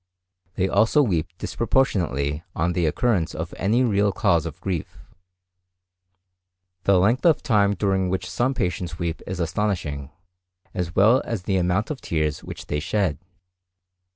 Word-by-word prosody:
They 95 - +1
also 115 +9 +4
weep 85 - 0
disproportionately 85 - 0
on 85 +2 0
the 85 -2 +1
occurrence 95 0 0
of 80 +2 -5
any 115 +7 +2
real 105 -3 +2
cause 85 -3 +1
of 80 - -8
grief. 90 -5 -4 1.9
The 100 -1 +5
length 110 +8 +2
of 165 -3 +4
time 105 -7 +3
during 95 -1 0
which 95 +1 -2
some 130 +3 0
patients 90 -4 -2
weep 85 0 -3
is 95 -1 -4
astonishing, 85 -6 -2 0.6
as 90 -2 -3
well 110 +7 +5
as 115 -6 -4
the 95 0 0
amount 90 +6 0
of 145 - -5
tears 75 -2 -1
which - - -8
they 75 - -2
shed. 90 -3 -1
95 Hz, 145 wpm, -24 LUFS, 85-105 Hz, 1.9 s, The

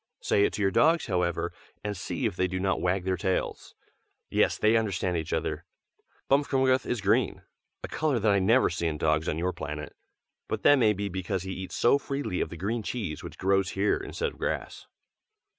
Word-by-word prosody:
Say 100 - +3
it - - -1
to 105 - -2
your 95 - +3
dogs, 160 - +4
however, 90 -4 -1 0.3
and 105 0 -2
see 110 +7 -3
if 105 -5 -1
they 90 0 +1
do 90 0 -3
not 95 +1 0
wag 90 +1 +1
their 95 0 0
tails. 95 +2 -2 0.6
Yes, - - +2
they 110 +1 +3
understand 95 -5 0
each 80 -2 -3
other. - - -2 0.6
Bmfkmgth 130 -2 +2
is 120 -3 -1
green, 105 +3 +1 0.4
a - - -3
color 150 -4 0
that 110 -1 +2
I 100 - +4
never 115 +7 +4
see 85 - -1
in 75 -2 -2
dogs 75 +1 +1
on 75 - -1
your 90 +2 -1
planet; 75 +1 -6 0.5
but - - -3
that 145 -1 +6
may 110 -3 +4
be 100 0 -3
because 95 0 -3
he 95 0 -4
eats 95 0 -6
so 130 +4 +4
freely 135 -10 -3
of - - -1
the 85 - -8
green 110 +7 -2
cheese 100 -9 -4
which - - -9
grows 95 0 +2
here 100 +2 +2
instead 470 -1 -3
of - - -18
grass. - - -3
100 Hz, 205 wpm, -28 LUFS, 90-115 Hz, 0.6 s, that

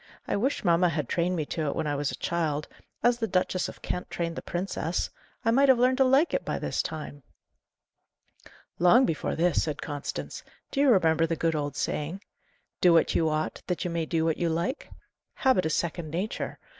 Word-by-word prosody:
"I - - 0
wish 260 +8 0
mamma 175 -1 +4
had 150 -4 -2
trained 175 +5 0
me 155 -3 -1
to 155 0 -3
it - - -1
when - - -1
I 145 - 0
was 145 -1 -1
a - - -4
child, 155 -3 -1 0.4
as 240 0 +3
the 225 - 0
Duchess 185 -1 0
of - - -13
Kent 180 - -3
trained 170 -1 -3
the - - -5
princess! 175 -2 -2 0.3
I 225 - +4
might 275 +3 +4
have 260 - +7
learned 255 +2 +3
to - - +7
like 270 +6 +3
it - - 0
by - - -2
this - - -1
time." 150 -2 -6 1.6
"Long 230 +9 +6
before 160 - -2
this," 170 0 +2
said 150 -2 -3
Constance. 145 0 -5 0.3
"Do 275 - -2
you 280 -1 +5
remember 165 -6 +4
the 165 - -1
good 165 +1 0
old 145 -2 -2
saying, 160 +8 -3 0.6
'Do 175 -2 +6
what 165 - +4
you 160 -1 +2
ought, 155 0 -2
that 180 -1 -2
you 175 - -1
may 165 -1 -2
do 160 0 0
what 160 -1 +1
you 170 - 0
like'? 170 - -2 0.5
Habit 255 -11 +2
is 160 - 0
second 170 -1 -2
nature. 180 +8 -3
170 Hz, 205 wpm, -27 LUFS, 160-195 Hz, 1.6 s, have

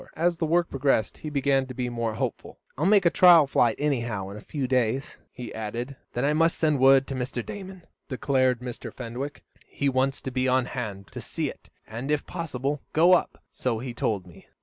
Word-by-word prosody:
As 170 +1 +1
the 165 -2 -1
work 170 +1 +2
progressed, 135 -5 0
he 155 - -5
began 140 -2 +1
to 130 - -8
be 125 0 -2
more 115 -2 -2
hopeful. - - -4 0.2
"I'll 155 +6 0
make 200 -2 +5
a 170 - +5
trial 175 -4 +7
flight, 120 -4 +2
anyhow, 120 -9 -1
in 100 - -8
a - - -9
few 140 -4 -3
days," 130 +1 0
he 125 -1 -8
added. 115 +5 -5 0.2
"Then 120 +3 0
I 150 - +2
must 165 +2 +2
send 155 -3 +2
word 135 +1 +6
to 135 - -5
Mr. 125 -2 -3
Damon," 190 -3 -8 0.3
decided 130 -1 +1
Mr. 125 -2 -6
Fenwick. 125 +4 -6 0.2
"He 140 - -1
wants 135 +1 +1
to 130 - -5
be 130 0 0
on 130 0 +3
hand 110 -6 -6
to - - -7
see - - -3
it, - - -18 0.2
and, 115 +6 -6
if 150 -1 0
possible, 145 -4 -3
go 170 +4 +6
up; 180 - +1
so 125 -3 -2
he 120 +2 -5
told 105 -5 -1
me." 85 -3 -16
130 Hz, 210 wpm, -26 LUFS, 120-150 Hz, 0.3 s, trial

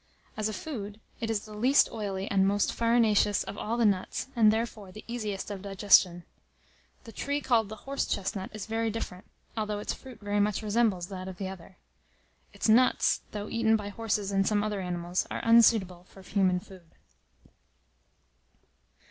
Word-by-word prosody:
As 215 0 -1
a - - -4
food, 210 -7 -6 0.2
it 225 -3 -3
is 220 -1 -1
the 215 - -11
least 250 +7 +4
oily 200 -4 -3
and 195 -1 +3
most 205 +1 +1
farinaceous 230 -3 +3
of - - -7
all 225 +3 -3
the 235 - +3
nuts, 200 +5 0
and, 220 -3 +6
therefore, 220 -3 -3
the 215 - -11
easiest 215 -4 -4
of 195 -2 -6
digestion. 195 -3 +4 0.8
The 225 - -11
tree 285 +6 -2
called 235 -6 +1
the 215 - -6
horse 275 +1 -2
chestnut 190 0 -3
is 215 -2 -6
very 225 0 -1
different, 205 -4 -6 0.3
although 215 -2 -2
its 205 - -3
fruit 255 -4 -12
very 205 -1 -1
much 205 0 +1
resembles 210 -4 +1
that 185 -1 -6
of 190 -1 -7
the 190 0 -4
other. 190 0 -11 0.7
Its - - -2
"nuts," 240 +4 +4
though 205 0 -5
eaten 225 -1 +2
by 205 -2 -3
horses 205 -2 -2
and 195 0 +2
some 210 -1 +2
other 210 -2 -2
animals, 175 0 -2
are - - -4
unsuitable 220 -6 +4
for 195 - -15
human 185 -2 +1
food. 180 -4 -16
210 Hz, 175 wpm, -29 LUFS, 195-225 Hz, 0.8 s, and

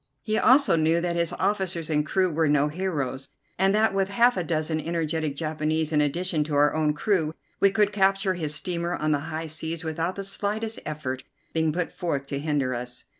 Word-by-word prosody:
He 215 - -1
also 275 -5 +5
knew 160 +1 +3
that 170 0 -1
his 170 -1 0
officers 190 -5 0
and 150 -1 +1
crew 185 +2 +1
were 160 +1 +2
no 145 0 +3
heroes, 150 -6 -3 0.3
and 195 +1 +3
that 215 -1 +3
with 195 0 +1
half 235 +5 +4
a 180 - -1
dozen 160 -1 -1
energetic 160 -2 -2
Japanese 155 0 -1
in 150 -1 +3
addition 160 +2 0
to 150 -1 -3
our 145 +1 +4
own 155 -1 +1
crew 160 -3 0 0.2
we 200 - +6
could 205 0 +2
capture 195 -1 +2
his 155 -4 -1
steamer 170 +3 -2
on 155 0 -1
the 145 - +2
high 160 +1 -3
seas 160 +1 -3
without 165 +3 -2
the 200 - -4
slightest 210 +3 -3
effort 140 -4 -4 0.3
being 160 -1 +1
put 175 +2 -2
forth 145 -6 -2
to 140 - -2
hinder 145 -4 0
us. 125 +1 -6
160 Hz, 200 wpm, -26 LUFS, 150-190 Hz, 0.3 s, we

